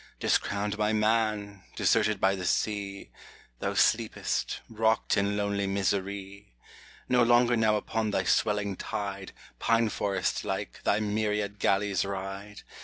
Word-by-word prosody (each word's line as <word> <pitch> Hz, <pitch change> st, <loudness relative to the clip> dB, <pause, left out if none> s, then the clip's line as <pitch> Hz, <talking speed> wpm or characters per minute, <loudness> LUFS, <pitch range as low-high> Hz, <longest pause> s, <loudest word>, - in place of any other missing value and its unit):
Discrowned 100 Hz, +1 st, 0 dB
by 105 Hz, 0 st, +1 dB
man, 105 Hz, -2 st, 0 dB
deserted 110 Hz, -2 st, +2 dB
by 95 Hz, 0 st, +3 dB
the 95 Hz, -2 st, -4 dB
sea, 100 Hz, -2 st, -2 dB, 0.5 s
Thou -, -, -2 dB
sleepest, -, -, +1 dB
rocked 110 Hz, 0 st, +1 dB
in 100 Hz, 0 st, +1 dB
lonely 100 Hz, -1 st, -1 dB
misery! 100 Hz, -3 st, -3 dB, 0.5 s
No 125 Hz, -1 st, +3 dB
longer 120 Hz, 0 st, +4 dB
now 110 Hz, -2 st, +3 dB
upon 110 Hz, +1 st, -1 dB
thy 100 Hz, -, 0 dB
swelling 105 Hz, -2 st, +1 dB
tide, 100 Hz, -2 st, -4 dB, 0.3 s
Pine 115 Hz, -1 st, +2 dB
forest 100 Hz, -3 st, -1 dB
like, -, -, -4 dB
thy 105 Hz, -, +3 dB
myriad 105 Hz, -1 st, -1 dB
galleys 100 Hz, -2 st, +1 dB
ride 100 Hz, +1 st, -6 dB
105 Hz, 125 wpm, -28 LUFS, 100-110 Hz, 0.5 s, longer